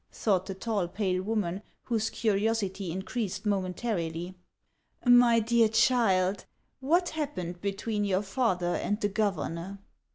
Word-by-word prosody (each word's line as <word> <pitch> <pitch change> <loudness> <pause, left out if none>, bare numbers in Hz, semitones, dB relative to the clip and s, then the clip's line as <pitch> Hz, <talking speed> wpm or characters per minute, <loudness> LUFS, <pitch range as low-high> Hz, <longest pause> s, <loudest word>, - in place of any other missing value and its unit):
thought 190 -4 0
the 195 - -4
tall, 200 -2 -1
pale 185 -1 -1
woman, 200 -3 -2 0.2
whose 225 -2 -1
curiosity 205 -3 0
increased 195 +4 -4
momentarily. 185 -3 -2 0.7
"My 245 -1 +6
dear 230 0 +3
child, 200 -5 +2 0.3
what 340 +7 +2
happened 180 - -4
between 205 +2 -2
your 195 0 +1
father 195 -5 0
and 205 +1 -1
the 205 - 0
governor 195 -2 -2
200 Hz, 120 wpm, -29 LUFS, 185-225 Hz, 0.7 s, My